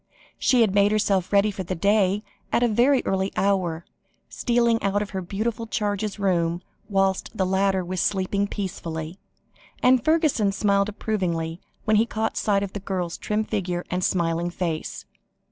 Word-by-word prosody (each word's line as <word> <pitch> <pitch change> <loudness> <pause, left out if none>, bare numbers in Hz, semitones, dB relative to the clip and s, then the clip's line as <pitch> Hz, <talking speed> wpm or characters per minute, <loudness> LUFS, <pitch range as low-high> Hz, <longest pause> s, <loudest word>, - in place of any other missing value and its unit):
She 255 -2 +4
had 215 -4 +3
made 200 0 +4
herself 200 -4 +1
ready 205 +1 +4
for 195 - -6
the 185 0 -3
day 200 +2 +2 0.3
at 240 - +2
a - - +4
very 245 +5 +3
early 190 0 0
hour, 180 -4 0 0.4
stealing 235 -2 +1
out 200 +1 +1
of 205 - -9
her 190 -2 -3
beautiful 220 +5 -3
charge's 210 -1 -2
room 175 -3 0 0.3
whilst 195 -1 +1
the 190 - +2
latter 190 0 +1
was 180 0 -2
sleeping 200 +1 0
peacefully, 170 -4 -5 0.6
and 250 -1 +5
Fergusson 310 - +2
smiled 200 0 +2
approvingly 175 -6 -2 0.2
when 215 0 +4
he 225 +2 +3
caught 220 -1 -2
sight 200 -2 +1
of 195 - -5
the 205 - -4
girl's 185 -3 -3
trim 215 +1 -1
figure 180 -5 -3
and 180 0 -1
smiling 170 -1 0
face. 170 -3 -4
200 Hz, 160 wpm, -24 LUFS, 185-215 Hz, 0.6 s, and